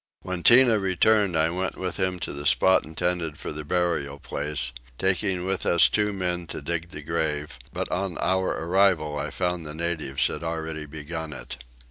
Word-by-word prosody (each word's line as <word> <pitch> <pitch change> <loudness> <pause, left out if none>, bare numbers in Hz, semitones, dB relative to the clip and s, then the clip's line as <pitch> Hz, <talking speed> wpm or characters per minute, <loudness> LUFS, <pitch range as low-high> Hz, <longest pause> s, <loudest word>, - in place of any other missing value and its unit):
When 90 -1 -4
Tinah 120 0 +6
returned 95 0 +3
I 80 +1 +3
went 95 +2 -2
with 90 -2 -3
him 95 -1 0
to - - -3
the 70 +1 -3
spot 95 +5 +5
intended 80 0 -2
for - - -6
the 75 0 -6
burial 75 -4 -1
place, 70 -3 -2 0.3
taking 95 0 +1
with 95 0 -1
us 85 - +5
two 105 -1 +1
men 90 -3 -2
to - - -5
dig 85 0 -2
the 75 - -9
grave; 75 -2 -2
but - - -3
on 95 -1 -2
our 95 +1 +1 0.2
arrival 85 -5 +2
I 75 +2 -3
found 90 -1 -2
the 75 -1 -5
natives 80 -5 0
had - - -2
already 80 -2 -4
begun 80 +1 -6
it. 65 0 -7
85 Hz, 180 wpm, -25 LUFS, 75-95 Hz, 0.3 s, Tinah